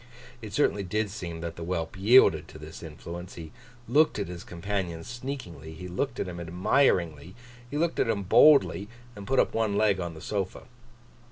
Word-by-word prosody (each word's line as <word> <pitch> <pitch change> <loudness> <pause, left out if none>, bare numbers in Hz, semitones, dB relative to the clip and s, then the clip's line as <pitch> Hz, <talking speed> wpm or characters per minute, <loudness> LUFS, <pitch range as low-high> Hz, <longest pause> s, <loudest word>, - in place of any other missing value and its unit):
It 110 -2 -8
certainly 105 -5 +1
did 105 +2 -2
seem 85 -5 -6
that 85 -1 -5
the 85 - -6
whelp 85 0 -3
yielded 95 -6 +5
to - - -12
this 75 0 -10
influence. 85 +2 -8
He 80 -2 -9 0.4
looked 150 +7 +3
at 100 -4 -3
his 90 -1 -7
companion 90 -2 -4
sneakingly, 120 - -7
he 90 +3 -8
looked 110 +10 -3
at - - -2
him 90 -1 -6
admiringly, 90 - +1 0.3
he 145 - -4
looked 170 +2 0
at - - +2
him 100 -3 0
boldly, 135 -1 +5 0.3
and 100 -1 -9
put 135 +2 +2
up - - +2
one 110 -3 0
leg 105 -3 +3
on 85 -2 -4
the - - -9
sofa. 100 -3 -3
95 Hz, 185 wpm, -27 LUFS, 85-110 Hz, 0.4 s, yielded